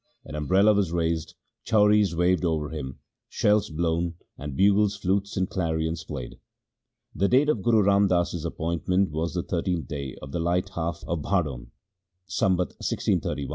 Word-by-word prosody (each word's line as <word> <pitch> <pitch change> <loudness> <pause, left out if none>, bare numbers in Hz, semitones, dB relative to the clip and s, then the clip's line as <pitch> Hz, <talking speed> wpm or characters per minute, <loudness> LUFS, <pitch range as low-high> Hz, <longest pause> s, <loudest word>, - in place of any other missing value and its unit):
An - - -10
umbrella 95 +8 +3
was 100 -5 +1
raised, 85 -1 -1 0.3
chauris 105 -3 +3
waved 90 +2 +2
over 80 -3 0
him, 70 -5 -6 0.3
shells 105 0 +2
blown, 85 +1 -1 0.2
and 70 -1 -7
bugles, 100 +1 +4
flutes, 100 +1 -1
and 95 0 +1
clarions 80 -3 -2
played. 65 -6 -7 0.7
The 100 - +1
date 135 +6 +4
of 120 -9 +1
Guru 110 -1 +3
Ram 100 +1 +4
Das's 85 -3 0
appointment 85 +2 -1
was 80 +3 -2
the 85 - -1
13th 90 -2 -2
day 70 -3 -5
of 65 - -9
the 85 - -2
light 85 +2 0
half 85 0 -4
of 85 -3 -2
Bhadon, 75 -10 -1 0.6
Sambat 90 0 0
1631 70 - -1
(a. - - -7
85 Hz, 160 wpm, -26 LUFS, 80-100 Hz, 0.7 s, bugles